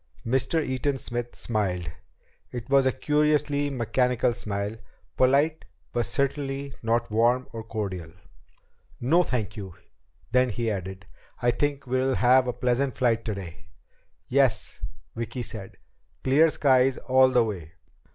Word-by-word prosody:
Mr. 135 +6 +1
Eaton 135 +2 -1
Smith 120 -1 -4
smiled. 90 -8 -2 0.6
It 120 +1 -7
was 135 -1 +5
a - - +3
curiously 150 -1 +1
mechanical 125 -1 +1
smile 105 -2 -4 0.4
polite 140 +5 +3 0.3
but 120 -2 0
certainly 140 0 -2
not 115 0 0
warm 120 +4 +2
or 115 -1 -5
cordial. 95 -7 -4 0.9
"No, 155 +9 +4
thank 110 - -2
you." 95 -5 -8 0.6
Then 125 +1 +3
he 115 0 -1
added: 95 -1 -5 0.3
"I 120 - +3
think 140 +3 -1
we'll 130 +1 +1
have 125 +1 +4
a 125 - -1
pleasant 125 +1 0
flight 115 -3 +2
today." 95 -6 -6 0.6
"Yes," - - +1 0.3
Vicki 115 +2 -4
said. 105 -4 -7 0.5
"Clear 145 +5 +5
skies 130 -3 +3
all 130 0 +4
the 125 -2 +4
way. 90 -7 -5
125 Hz, 130 wpm, -26 LUFS, 110-135 Hz, 0.9 s, was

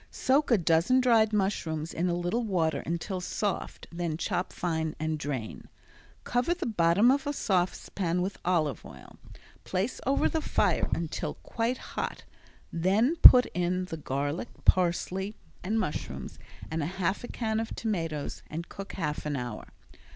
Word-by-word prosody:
Soak 285 +3 +1
a 235 - +5
dozen 170 +8 +3
dried 230 -4 +4
mushrooms 165 -6 -1
in 175 +2 0
a 175 - +1
little 175 +7 -1
water 165 -8 0
until 175 +3 -3
soft, 200 +2 -3
then 170 -2 -2
chop 180 +2 -2
fine 160 -3 -2
and 155 0 -1
drain. 135 -7 -5 0.5
Cover 250 +8 +1
the 355 -1 -4
bottom 200 +2 +4
of 280 +1 0
a 290 - 0
saucepan 180 -4 0
with 190 +1 -4
olive 155 -8 0
oil, - - -13 0.4
place 190 +6 -2
over 275 - +3
the 320 - -1
fire - - +1
until 165 -2 -3
quite 235 +2 -2
hot, - - -5 0.5
then 200 - +2
put 250 -5 +10
in 180 +1 0
the 165 -3 -6
garlic, 145 +1 -2 0.2
parsley, 185 +3 +2 0.3
and 215 +5 0
mushrooms, 150 - -4 0.3
add 160 0 -1
half 185 +6 -1
a - - -5
can 220 -3 -2
of 225 - -4
tomatoes 165 -9 -3
and 165 +2 -5
cook 195 0 -8
half 150 -5 -3
an 145 - -1
hour. 120 -4 -5
180 Hz, 150 wpm, -29 LUFS, 160-220 Hz, 0.5 s, put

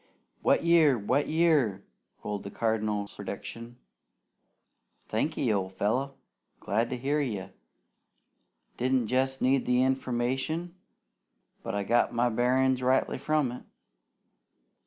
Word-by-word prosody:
"Wet - - +3
year! 165 -6 +5
Wet 125 +7 0
year!" 150 - +2 0.4
rolled 105 -1 -3
the 100 - -7
Cardinal's 105 -2 -1
prediction. 115 +1 -7 1.3
"Thanky, - - 0
old 95 -1 -2
fellow! 130 +8 -1 0.4
Glad 110 +5 0
to 125 - -3
hear 140 +4 0
you! 105 -9 -4 1.3
Didn't 130 -1 +1
jest 130 +1 0
need 130 0 +2
the 125 0 +3
information, 130 +6 -1 0.9
but - - -4
I 100 - -1
got 120 +4 +2
my 120 +1 +2
bearin's 130 +2 +2
rightly 130 +1 +1
from 150 -2 +1
it! 125 - -8
125 Hz, 115 wpm, -28 LUFS, 110-135 Hz, 1.3 s, year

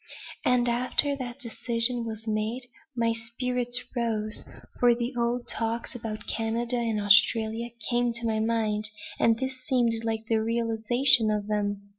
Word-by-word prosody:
And 250 -1 +2
after 255 +4 +2
that 250 -1 -7
decision 235 0 0
was 225 -1 -6
made, 220 +4 -2 0.3
my 230 -1 +1
spirits 245 +2 -1 0.2
rose, 220 -3 -2 0.4
for 240 -1 +5
the 240 +2 -3
old 240 0 -1
talks 230 +2 -2
about 225 -3 -6
Canada 230 +2 0
and 230 -3 -1
Australia 220 +3 +3 0.2
came 240 0 +1
to 235 0 -5
my 220 -1 0
mind, 215 -2 0 0.3
and 225 -1 +3
this 260 +1 -5
seemed 240 -3 +2
like 225 -1 -2
a 220 - +4
realization 230 +2 +3
of 210 -1 -1
them. 205 -1 -2
230 Hz, 145 wpm, -27 LUFS, 220-245 Hz, 0.4 s, for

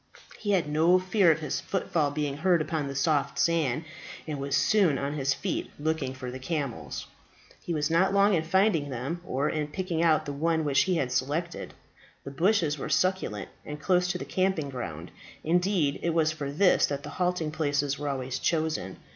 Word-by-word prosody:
He 210 - -4
had 175 -6 +2
no 160 +4 +4
fear 185 -1 +3
of 160 0 -1
his 150 - -2
footfall 165 -5 0
being 145 -1 -2
heard 175 +2 +3
upon 155 -2 -2
the 140 - -5
soft 145 0 +1
sand, 160 -3 +1 0.4
and 150 -3 -4
was 140 0 0
soon 190 -10 +3
on 140 +2 -2
his 135 -2 0
feet, - - -3
looking 150 -4 -1
for 130 -1 -6
the 130 - -7
camels. 140 -3 -4 0.6
He - - -5
was 150 +1 0
not 185 +4 +3
long 200 +1 +4
in 165 - +3
finding 165 -2 +2
them, 135 +7 -4
or 140 -4 -1
in 150 -1 -1
picking 170 +1 -2
out 165 -2 +3
the 145 - -4
one 160 +2 0
which 140 -1 +3
he 185 -1 +1
had 135 -6 -1
selected. 145 +7 -2 0.5
The 140 - -7
bushes 160 -1 +1
were 155 - -4
succulent, 155 - 0
and 150 0 -7
close 180 +2 +2
to 180 - -1
the - - -6
camping 185 -6 0
ground; 85 - -6 0.3
indeed, 175 -3 +1
it 170 -1 -1
was 155 -1 +3
for 150 -3 -5
this 180 +6 +4
that 140 -1 -4
the 145 - -7
halting 180 -3 0
places 145 -2 0
were 145 0 -2
always 130 -1 -3
chosen. 155 - -1
155 Hz, 195 wpm, -28 LUFS, 140-175 Hz, 0.6 s, no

